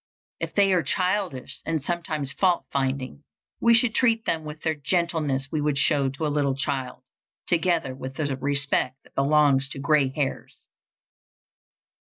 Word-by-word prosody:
If - - -5
they 195 -2 +4
are 180 - +3
childish 180 -2 -1
and 160 -1 -1
sometimes 155 -3 -3
fault 180 +1 +1
finding, 130 - -2 0.4
we 235 0 +5
should 230 0 +3
treat 230 -2 +2
them 160 -1 0
with 155 0 -9
the 160 - +1
gentleness 150 -3 -1
we 155 - -1
would 145 -1 0
show 140 0 +2
to 140 +4 -4
a - - +1
little 145 -2 0
child, 135 -2 -3 0.4
together 170 -5 +1
with 130 0 -8
the 145 -3 -2
respect 140 -1 0
that - - -23
belongs 140 -1 +3
to - - -6
gray 145 0 +3
hairs. 135 0 -4
145 Hz, 155 wpm, -25 LUFS, 135-170 Hz, 0.4 s, we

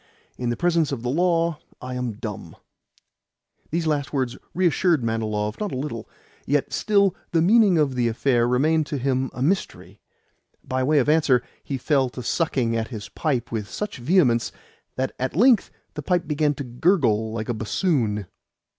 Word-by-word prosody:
In 125 -1 -3
the 120 - -1
presence 165 -2 +1
of 125 -4 -4
the 125 - -1
law 170 0 +1 0.2
I 125 0 -6
am 125 -2 -3
dumb." 105 -1 -7 1.1
These 165 +1 -1
last 150 -3 -1
words 130 -4 -1 0.2
reassured 175 -4 +2
Manilov 110 0 -2
not 210 -2 -2
a - - -3
little: 130 -5 -5 0.4
yet 145 0 0
still 200 -3 +2 0.2
the 165 - +4
meaning 205 -1 +5
of 145 -4 +2
the 125 -2 +1
affair 120 +1 +1
remained 150 +5 +2
to 150 -1 -3
him 130 0 0
a 125 - -4
mystery. 185 +7 -2 0.6
By 130 -1 -2
way 150 +4 +2
of 135 - +3
answer, 150 -6 +3 0.2
he 135 - -3
fell 135 0 +1
to 125 0 -8
sucking 130 -8 0
at 110 -1 -1
his 110 -5 -8
pipe 130 -7 -2
with 110 -3 -3
such 210 -6 -5
vehemence 125 -4 +2 0.4
that 130 0 -1
at 130 +2 -2
length 235 +4 +4 0.2
the - - -5
pipe 180 -2 0
began 150 -1 +1
to 140 - -5
gurgle 120 - +1
like 110 -1 -4
a 120 - -1
bassoon. 110 - 0
135 Hz, 170 wpm, -23 LUFS, 120-165 Hz, 1.1 s, meaning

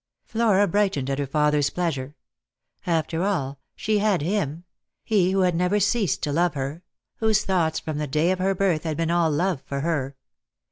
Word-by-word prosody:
Flora 210 -3 +2
brightened 190 -8 0
at 135 - -2
her 140 - -1
father's 150 0 +2
pleasure. 150 -5 -3 0.7
After 165 0 0
all, 145 -9 -1 0.2
she 215 -1 0
had 205 -6 +1
him; 170 -3 -1 0.4
he 195 -5 +2
who 190 0 +1
had 180 -1 +3
never 180 +4 +1
ceased 200 -1 +1
to 145 - 0
love 170 +1 +1
her; 140 +4 -4 0.4
whose 220 -2 +2
thoughts, 170 -4 +1
from 155 -2 -4
the 150 - -2
day 155 +6 +1
of 185 - -1
her 190 +1 +1
birth, 180 -5 +1
had 155 -2 -3
been 165 0 0
all 170 -1 +3
love 170 0 0
for 140 0 -4
her. 140 -4 -1
170 Hz, 185 wpm, -24 LUFS, 150-195 Hz, 0.7 s, had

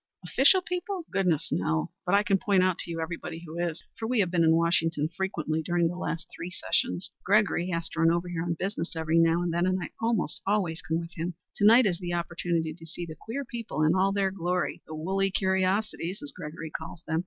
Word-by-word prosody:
"Official 285 - +5
people? 360 0 -3
Goodness, 170 -5 +1
no. 80 -3 0 0.2
But 190 - +4
I 205 - +4
can 195 -2 +2
point 195 -2 +3
out 185 -2 +1
to - - -4
you 165 - -3
who 165 - -1
everybody 170 0 -6
is, 170 -2 -2 0.2
for 225 - -2
we 245 -1 +1
have 180 -3 0
been 170 -2 +3
in 160 0 +5
Washington 165 -2 +2
frequently 160 -5 -1
during 175 +1 +1
the 175 - -5
last 165 -2 -3
three 175 - -5
sessions. 180 0 0
Gregory 195 -3 +3
has 165 -2 -1
to - - -6
run 165 0 +5
over 170 +1 +1
here 175 -2 -3
on 170 0 -1
business 180 -3 -3
every 160 +1 +2
now 165 +1 +4
and 170 -1 -1
then, 175 +2 +2
and 185 0 +1
I 175 - -5
almost 225 -4 0
always 185 -5 +1
come 160 0 -1
with 170 0 -7
him. 170 +1 -3 0.2
To 205 - +2
night 235 +3 +8
is 175 -4 +1
the 175 -2 -3
opportunity 170 -2 -1
to 165 0 -13
see 175 +2 -5
the 160 - -7
queer 235 - -5
people 230 - -3
in 155 +2 +4
all 190 +1 +3
their 195 -1 +1
glory 180 -1 -1
the 155 - -6
woolly 195 +5 0
curiosities, 190 0 0
as 145 - -3
Gregory 160 -2 -7
calls 170 - -7
them. 160 - 0
175 Hz, 230 wpm, -28 LUFS, 165-195 Hz, 0.2 s, night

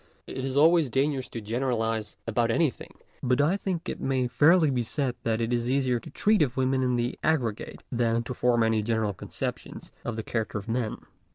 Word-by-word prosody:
It 130 - -5
is 135 +1 -2
always 160 -1 +5
dangerous 135 0 0
to 115 - -6
generalize 115 -1 -1
about 115 +1 +1
anything, 145 +2 0 0.3
but 125 0 +1
I 150 +6 +3
think 185 -3 -3
it - - -4
may 130 -1 +1
fairly 150 +6 +4
be 125 -2 0
said 130 +2 -1
that 115 -1 0
it 115 +1 -1
is 120 0 0
easier 130 -2 +1
to - - -11
treat 210 -2 +2
of 135 -4 +1
women 130 0 +2
in 125 -1 +1
the 120 +1 -2
aggregate 130 -9 -1
than 115 -1 +1
to 125 - -5
form 120 -1 +2
any 110 -1 +2
general 110 -1 0
concep - - -4
tion - - -10 0.2
of 120 - -3
the 110 - -4
character 110 -2 -2
of 100 - -7
men. 115 -1 -2
125 Hz, 205 wpm, -27 LUFS, 115-135 Hz, 0.3 s, always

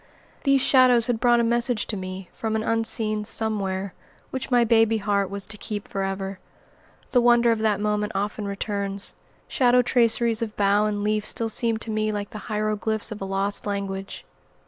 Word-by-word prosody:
These 275 -1 +4
shadows 255 -3 +5
had 240 -2 -1
brought 240 0 +4
a - - +1
message 235 -1 +1
to 215 - -3
me 185 -1 -7
from 220 -1 -3
an 220 - -1
unseen 220 -1 +1
Somewhere, 200 -3 -1 0.4
which 260 0 -4
my 245 -2 +4
baby 225 -1 +3
heart 200 -2 0
was 200 0 -3
to 215 -2 -4
keep 210 -2 -5
forever. 195 0 -4 0.7
The 245 - +4
wonder 240 0 +4
of 225 - 0
that 215 -2 +1
moment 210 0 -1
often 205 +1 -2
returns. 200 0 -2 0.3
Shadow 250 -1 +3
traceries 235 -2 +2
of 220 -2 -4
bough 205 +1 +3
and 205 -1 -2
leaf 210 0 0
still 225 +1 -2
seem 230 0 +1
to 225 0 -5
me 215 0 0
like 205 -1 -4
the 215 - -7
hieroglyphics 215 +1 -1
of 210 - -7
a - - -3
lost 195 +2 -1
language. 195 -1 -4
215 Hz, 180 wpm, -24 LUFS, 200-230 Hz, 0.7 s, shadows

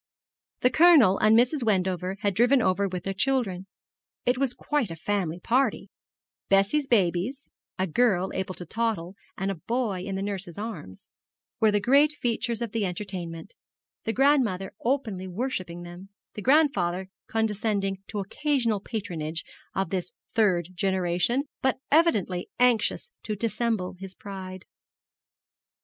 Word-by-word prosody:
The 250 - +4
Colonel 300 - +6
and 215 +1 +5
Mrs. 255 +5 +3
Wendover 190 -3 0
had 200 -1 +1
driven 245 +7 +4
over 195 -2 +2
with 180 -2 -5
their 195 - -2
children. 195 -4 0 0.6
It 245 +1 +2
was 265 -3 0
quite 295 -9 -1
a 165 - -5
family 180 -1 -2
party 255 +7 0 0.6
Bessie's 200 +9 +3
babies, 210 +5 +1 0.3
a 185 - +1
girl 190 0 +2
able 190 -1 -3
to 175 - -8
toddle, 205 -3 -2 0.2
and 195 +1 -1
a 175 -5 -7
boy 230 -6 0
in 195 +1 -4
the 195 - -2
nurse's 195 -4 -5
arms, 205 - -7 0.5
were 220 -2 +5
the 205 0 +2
great 280 +8 +4
features 235 -3 -1
of 230 - -4
the 225 -1 -1
entertainment, 180 -1 -5 0.5
the 225 - -1
grandmother 240 -8 +2
openly 225 -8 -1
worshipping 185 -4 -4
them, 175 +3 -10 0.2
the 210 - -6
grandfather 195 - +2 0.2
condescending 210 -4 -1
to 210 - -6
occasional 235 +2 0
patronage 170 -8 -4 0.3
of 190 -3 -1
this 185 +1 -3 0.2
third 185 -7 +2
generation, 185 +6 +1 0.2
but 265 -1 +2
evidently 210 - +2
anxious 245 - +2
to 215 - -3
dissemble 220 -2 -1
his 190 -1 -8
pride. 190 -2 -8
200 Hz, 140 wpm, -26 LUFS, 185-240 Hz, 0.6 s, Colonel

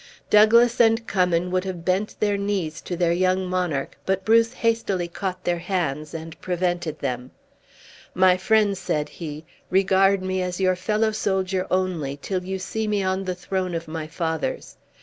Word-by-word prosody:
Douglas 235 +3 +6
and 225 0 +3
Cummin 180 -3 +1
would 185 0 +1
have 180 -3 -6
bent 190 +3 0
their 205 -1 +2
knees 200 -5 -2
to 175 - -5
their 175 -1 +2
young 185 +2 +1
monarch, 180 -7 -2
but 190 0 -1
Bruce 230 +1 +4
hastily 225 -7 0
caught 185 +1 -5
their 175 -1 0
hands, 165 -5 -2
and 165 0 -8
prevented 175 -3 -1
them: 125 -2 -4 0.9
"My 185 0 +5
friends," 200 +1 +2
said 150 -5 -1
he, 155 0 -7 0.2
"regard 195 0 +3
me 185 0 -1
as 180 0 -3
your 185 -1 +3
fellow 210 +4 0
soldier 190 -3 -1
only, 175 -7 -1
till 185 +4 -3
you 190 +1 -3
see 215 +4 -3
me 205 -2 0
on 190 +1 -1
the 185 -1 -2
throne 185 0 -3
of 165 0 -4
my 155 -1 -5
fathers. 160 -1 -3
185 Hz, 170 wpm, -24 LUFS, 170-195 Hz, 0.9 s, Douglas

